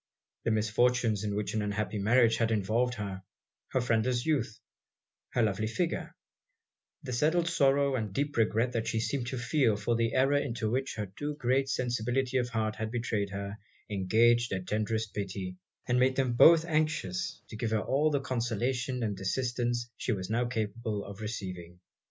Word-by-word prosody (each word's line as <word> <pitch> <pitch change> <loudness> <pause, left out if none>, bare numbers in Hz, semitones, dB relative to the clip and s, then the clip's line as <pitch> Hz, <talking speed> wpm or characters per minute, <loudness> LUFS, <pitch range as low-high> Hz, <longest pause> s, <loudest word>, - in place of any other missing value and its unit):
The - - +2
misfortunes 110 0 +2
in 105 -1 -2
which 105 0 -2
an 110 - 0
unhappy 105 +1 -2
marriage 115 +2 +4
had 115 -1 +1
involved 115 +4 +1
her, 100 -4 -5 0.5
her 130 - 0
friendless 120 0 +1
youth, 150 -8 0 0.7
her 120 - +3
lovely 105 0 0
figure, 170 +9 -2 0.9
the 130 -3 -4
settled 160 +7 +2
sorrow 140 -4 +3
and 110 -5 -2
deep 145 +7 -2
regret 115 +2 +2
that 115 -2 -2
she 115 0 0
seemed 120 +2 -2
to 130 - -3
feel 120 -3 +2
for 110 +3 0
the 115 0 0
error 135 +2 +4
into 115 -6 -2
which 135 +2 -1
her 105 -1 -3
too 145 +10 -5
great 135 0 +1
sensibility 125 +1 0
of 125 -1 0
heart 110 -2 -1
had 110 -1 -3
betrayed 110 -4 -1
her, 100 +1 -5 0.3
engaged 115 +5 +3
their 95 -1 -2
tenderest 110 +2 -2
pity, 95 -2 -4 0.3
and 125 0 +2
made 130 +1 +3
them 130 -2 +1
both 160 +6 +7
anxious 155 - -1
to - - -8
give 110 +1 -2
her 110 -1 +1
all 145 +4 +2
the 140 -2 0
consolation 125 +1 -1
and 105 -4 -2
assistance 120 +3 -1
she - - -2
was 95 -2 -3
now 120 +2 +1
capable 110 -2 -3
of 100 +1 -9
receiving. 90 -5 -6
115 Hz, 175 wpm, -30 LUFS, 105-130 Hz, 0.9 s, both